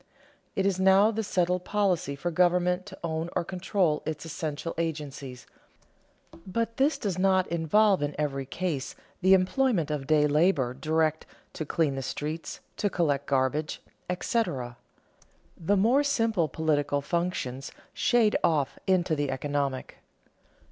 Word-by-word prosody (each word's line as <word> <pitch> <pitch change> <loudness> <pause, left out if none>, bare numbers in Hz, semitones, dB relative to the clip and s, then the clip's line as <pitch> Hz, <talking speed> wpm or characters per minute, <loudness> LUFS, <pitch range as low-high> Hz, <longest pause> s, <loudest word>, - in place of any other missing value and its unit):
It 195 - 0
is 195 -2 +1
now 190 +3 +5
the 220 0 -2
settled 180 -3 0
policy 185 -9 0
for 175 +5 -3
government 180 +2 +2
to - - -10
own 160 0 -2
or 175 - +1
control 180 -3 0
its 155 0 -5
essential 160 0 -4
agencies, 145 -5 -4 1.0
but 230 +4 -2
this 280 +4 +2
does 190 -4 -3
not 190 -1 +3
involve 185 +4 +3
in 145 0 -2
every 135 -3 -2
case 155 -4 -3 0.3
the 190 +1 +6
employment 190 - +1
of 140 -3 -3
day 150 -1 +4
labor 150 -4 +2
direct 155 +3 0 0.3
to 155 - -5
clean 155 -4 +1
the 135 - -3
streets, 155 +5 -5 0.2
to 205 - +1
collect 145 -7 0
garbage, 140 +3 0 0.3
etc. 175 - -1 0.8
The 200 +5 +1
more 235 +8 +4
simple 225 - +1
political 145 -1 0
functions 140 -6 -3 0.2
shade 230 -3 +3
off 150 -5 +1
into 180 -4 +2
the 145 -1 -1
economic. 140 -1 -2
165 Hz, 135 wpm, -27 LUFS, 145-190 Hz, 1.0 s, the